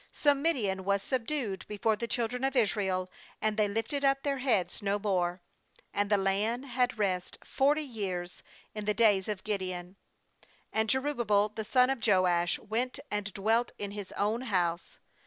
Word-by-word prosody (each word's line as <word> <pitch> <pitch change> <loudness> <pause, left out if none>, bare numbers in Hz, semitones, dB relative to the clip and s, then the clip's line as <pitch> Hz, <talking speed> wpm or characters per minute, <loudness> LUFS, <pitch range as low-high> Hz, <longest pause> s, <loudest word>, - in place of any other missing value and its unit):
28So 290 -1 +6
Midian 240 - 0
was 200 +1 +1
subdued 245 -6 -2
before 215 +1 +1
the 235 +2 -4
chil 235 -1 0
dren 250 +2 -5
of 270 0 +1
Israel, 190 -5 +1 0.3
and 215 -1 0
they 210 -1 +2
lifted 225 +7 -2
up 275 0 +3
their 280 -2 -1
heads 230 -7 +1
no 200 0 +1
more. 180 -3 -1 0.5
And 205 0 0
the 205 - +4
land 205 +6 0
had 250 -2 0
rest 185 -4 -1
forty 290 +3 +2
years 190 -9 -5 0.3
in 210 -1 -5
the 210 0 +1
days 205 -4 +4
df 210 -3 -3
Gideon. 185 -3 -4 0.8
29And 220 0 +1
Jerubbaal 230 -6 +1
the 220 - -3
son 250 +3 +4
of 270 - -2
Joash 180 -4 +3
went 235 +4 -2
and 205 0 -2
dwelt 225 +4 +1
in 200 -1 -4
his 205 -2 -7
own 215 +4 0
house. 180 -7 -1
210 Hz, 170 wpm, -30 LUFS, 195-245 Hz, 0.8 s, 28So